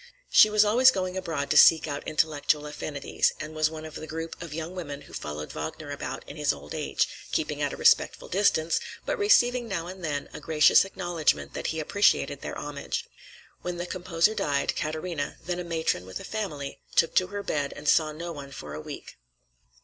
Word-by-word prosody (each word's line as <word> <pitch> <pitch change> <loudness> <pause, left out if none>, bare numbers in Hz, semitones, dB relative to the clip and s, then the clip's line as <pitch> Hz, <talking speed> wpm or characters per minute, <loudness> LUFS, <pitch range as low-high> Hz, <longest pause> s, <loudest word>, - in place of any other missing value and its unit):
She 215 - +8
was 210 0 +5
always 245 +5 +6
going 185 -6 -1
abroad 165 -6 -2
to - - +4
seek 160 -1 +7
out 145 -1 -3
intellectual 150 -1 +1
affinities, 150 -1 -1
and 155 0 -6
was 155 -1 +2
one 160 0 -8
of 155 - -9
the 155 - -7
group 165 +1 -5
of 170 -3 -7
young 160 +3 -5
women 145 -6 -6
who 140 - -15
followed 75 0 -5
Wagner 145 - -6
about 145 - -6
in 145 - -9
his 150 -1 +2
old 75 +1 -8
age, - - 0 0.2
keeping - - -1
at - - 0
a - - -6
respectful - - +3
distance, 170 -4 +2 0.3
but - - -1
receiving 245 - +4
now 180 -6 -3
and 185 +1 -9
then 145 -3 -2
a - - -7
gracious 155 +3 +5
acknowledgment 175 -4 -1
that - - -3
he 160 - -2
appreciated 200 +7 +2
their - - -5
homage. - - -4 0.6
When 175 0 -4
the 175 - -3
composer 175 +2 +1
died, 145 -9 0
Katarina, 155 0 -3
then 175 0 -2
a - - -3
matron 160 - -1
with 95 - -6
a - - -9
family, 155 -11 -4 0.2
took 165 - +3
to 185 - +4
her 200 +1 -5
bed 145 -6 -1
and 145 +1 -8
saw 155 0 +4
no 170 +3 -6
one 145 -3 -8
for 75 - -8
a 75 - -5
week. - - -9
160 Hz, 205 wpm, -27 LUFS, 145-180 Hz, 0.6 s, She